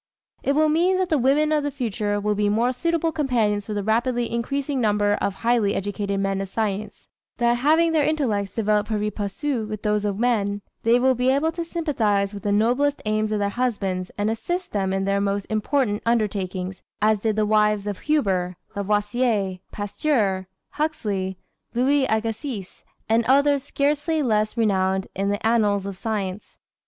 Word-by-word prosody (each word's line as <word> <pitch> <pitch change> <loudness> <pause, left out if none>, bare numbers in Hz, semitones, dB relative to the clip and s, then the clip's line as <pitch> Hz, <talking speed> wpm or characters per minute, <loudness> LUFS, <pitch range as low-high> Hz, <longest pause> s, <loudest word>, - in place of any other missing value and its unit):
It 275 - +1
will 310 +2 +3
mean 345 +5 +3
that 370 -1 0
the 310 - +2
women 285 +5 +3
of 305 -1 +3
the 290 - -1
future 215 -6 -2
will 210 +1 0
be 205 0 +1
more 235 +4 +2
suitable 330 +4 0
companions 230 -9 0
for 210 - -3
the 205 - -1
rapidly 235 +3 0
increasing 270 +3 -1
number 205 -2 +2
of 200 - -1
highly 230 -3 +1
educated 200 0 -2
men 195 0 0
of 195 - -5
science; 215 0 -3 0.3
that 240 0 +2
having 320 +6 +3
their 315 -2 +3
intellects 225 -11 0
developed 210 -1 +1
pari 210 -1 -1
passu 220 +4 -3
with 215 -1 -6
those 210 -1 +1
of 200 -2 -1
men, 205 -4 0 0.2
they 235 +2 +4
will 260 +1 +4
be 250 +1 +1
able 285 +5 +2
to 340 +1 -4
sympathize 225 - 0
with 200 - -7
the 205 - -1
noblest 250 +8 +2
aims 215 0 0
of 215 - +1
their 200 -1 0
husbands 200 -6 -2
and 210 +1 +1
assist 350 +12 -3
them 195 -2 0
in 195 0 0
their 200 +1 +1
most 200 0 -1
important 215 0 0
undertakings, 195 -5 -1 0.2
as 215 0 +3
did 215 0 0
the 215 0 +2
wives 210 -1 +2
of 205 -2 -4
Huber, 190 - 0 0.2
Lavoisier, 205 -1 0
Pasteur, 205 -3 0 0.2
Huxley, 205 - -2 0.4
Louis 265 +2 +3
Agassiz 220 -1 -3 0.2
and 225 +1 +3
others 280 +1 +4
scarcely 295 +3 0
less 215 -2 +1
renowned 190 -3 +1
in 195 +1 0
the 205 +1 -2
annals 210 -4 +2
of 200 -1 -5
science. 200 -2 -4
215 Hz, 175 wpm, -23 LUFS, 200-265 Hz, 0.4 s, they